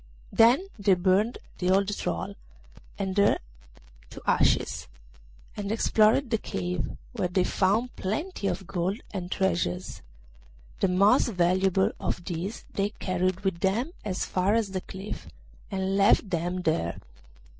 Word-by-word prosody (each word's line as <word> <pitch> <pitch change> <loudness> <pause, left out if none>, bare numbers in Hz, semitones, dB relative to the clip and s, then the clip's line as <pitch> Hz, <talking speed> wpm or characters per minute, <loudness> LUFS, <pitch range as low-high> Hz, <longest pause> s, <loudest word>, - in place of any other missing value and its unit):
Then 240 +11 +5
they 195 -1 +4
burned 190 +6 +2 0.2
the 180 - 0
old 200 +2 +2
troll 85 - -3 0.6
and 190 -1 -2
her 200 - +5 0.7
to - - -9
ashes, - - +2 0.7
and 205 -1 -3
explored 225 +3 +3
the 225 - +2
cave, 90 - -3
where 180 - -1
they 180 +1 +1
found 205 +7 +1
plenty 215 - -3
of 195 0 -2
gold 185 +4 -2
and 180 -3 -4
treasures. 180 -1 -1 0.8
The 195 - +3
most 195 +6 +4
valuable 190 -1 +2
of 175 - -3
these 185 +5 -4
they 200 0 0
carried 185 0 -1
with 190 -4 -1
them 215 - 0
as 190 -3 -2
far 190 +3 +1
as 220 -4 0
the 190 -1 -2
cliff, 190 +3 -7 0.4
and 190 -1 -1
left 200 0 +4
them 175 +1 -1
there. 160 - 0
190 Hz, 135 wpm, -27 LUFS, 180-205 Hz, 0.8 s, Then